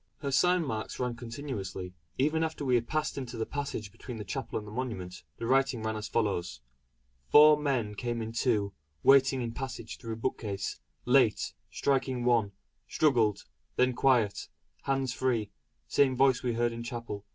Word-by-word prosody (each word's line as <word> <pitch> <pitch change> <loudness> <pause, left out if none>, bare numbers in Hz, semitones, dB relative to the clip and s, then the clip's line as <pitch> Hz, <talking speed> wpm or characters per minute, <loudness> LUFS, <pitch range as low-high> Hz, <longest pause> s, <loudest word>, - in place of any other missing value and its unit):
Her 140 -2 -2
sign 180 +5 +3
marks 110 -5 -4
ran 125 -2 -1
continuously, 115 -7 -6 0.2
even 155 +4 +2
after 155 -2 -3
we 130 - +2
had 120 -1 +2
passed 155 -2 -1
into 125 -3 -6
the 110 - -1
passage 140 -8 -4
between 125 +3 -8
the 105 - -5
chapel 115 +6 -4
and 105 - -6
the - - -8
monument; 105 -7 -5 0.2
the 115 - -4
writing 135 -2 +2
ran 110 0 -1
as 105 0 -4
follows: 95 - -1 0.7
"Four 150 +1 +8
men 135 -8 -1
came 120 +2 -3
in 110 0 -4
two 110 -4 +1 0.3
waiting 135 -1 +5
in 115 - -3
passage 120 -2 -6
through 115 -1 -5
bookcase 105 -4 -3 0.3
late 125 -4 +3 0.2
striking 130 -3 0
one 115 -5 +3 0.4
struggled 120 -9 +2 0.3
then 125 0 +3
quiet 120 -5 +2 0.4
hands 135 -2 0
free 120 -6 0 0.4
same 135 -2 +3
voice 135 -2 +4
we 125 -2 -1
heard 120 +1 +1
in 115 0 -6
Chapel. 115 -4 -5
120 Hz, 165 wpm, -30 LUFS, 110-135 Hz, 0.7 s, Four